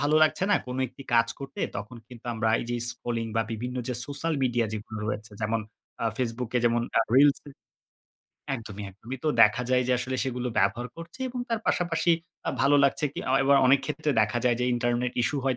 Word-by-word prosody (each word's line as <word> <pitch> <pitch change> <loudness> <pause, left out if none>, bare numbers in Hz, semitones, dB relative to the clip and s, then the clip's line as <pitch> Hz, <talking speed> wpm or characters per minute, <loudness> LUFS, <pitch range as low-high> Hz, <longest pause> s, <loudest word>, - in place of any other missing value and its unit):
ভালো 145 +2 +2
লাগছে 155 +4 +3
না - - +6
কোন 125 0 -4
একটি 130 +3 -12
কাজ 115 0 +5
করতে। 135 0 -7 0.2
তখন 105 +5 -7
কিন্তু 120 -2 -12
আমরা 110 0 0
এই - - -5
যে 120 - 0
স্ক্রলিং 115 -2 -3
বা 115 - +3
বিভিন্ন 125 +3 -4
যে 125 - -1
সোশ্যাল 150 +3 -2
মিডিয়া 120 -2 +2
যেগুলো 110 0 -6
রয়েছে 105 0 -4
যেমন 110 +1 0 0.4
আ - - 0
Facebook 120 -1 -2
e - - +5
যেমন 120 0 +3 0.2
আ - - +6
reels 140 +1 +6
এ - - -9 1.0
একদমই, 105 -4 -7
একদমই। 115 +7 -8
তো - - +3
দেখা 105 +3 +4
যায় 125 0 +4
যে 125 - +4
আসলে 130 +1 -2
সেগুলো 125 -1 -2
ব্যবহার 120 +1 +1
করছি 170 +9 -10
এবং 250 0 -5
তার 230 -1 -1
পাশাপাশি 175 -1 +1 0.4
আ - - +3
ভালো 140 +3 +5
লাগছে 140 +2 +2
কি - - -7 0.2
এয় 135 - +3
ও - - +4 0.2
অনেক 135 +1 +5
ক্ষেত্রে 150 +1 -1
দেখা 110 +3 0
যায় 120 -2 +3
যে, - - +2
ইন্টারনেট 120 0 0
ইসূ 145 - 0
হয় 130 -2 +1
125 Hz, 210 wpm, -27 LUFS, 115-140 Hz, 1.0 s, না